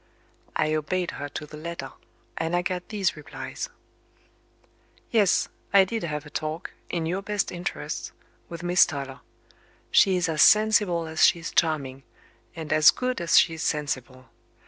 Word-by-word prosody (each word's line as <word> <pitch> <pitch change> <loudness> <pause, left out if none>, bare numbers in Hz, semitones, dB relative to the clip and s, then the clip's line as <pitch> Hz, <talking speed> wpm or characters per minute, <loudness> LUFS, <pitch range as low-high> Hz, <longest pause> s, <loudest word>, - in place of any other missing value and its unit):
I 155 0 +1
obeyed 170 +4 -1
her 145 - -6
to 150 - -6
the 150 0 -11
letter; 170 +2 -6 0.4
and 165 +1 -1
I 175 - +1
got 180 0 -3
these 200 -4 0
replies: 150 - -7 1.4
"Yes; 210 -5 +3 0.2
I 195 -1 +7
did 225 +3 -3
have 150 -3 -4
a 150 - -12
talk, 155 +2 -4 0.2
in 170 -2 -2
your 180 +4 -2
best 205 0 -2
interests, 175 - -5 0.4
with 170 0 -8
Miss 175 0 +5
Toller. 140 -2 -6 0.7
She 190 -2 +5
is 180 - 0
as 155 -2 0
sensible 210 -6 +4
as 160 0 0
she - - +6
is 165 - -6
charming, 140 -5 0 0.5
and 160 -2 -3
as 155 0 +7
good 255 -5 -1
as 170 +1 +3
she 165 - +5
is 160 - -6
sensible. 130 -5 -3
165 Hz, 160 wpm, -25 LUFS, 150-180 Hz, 1.4 s, I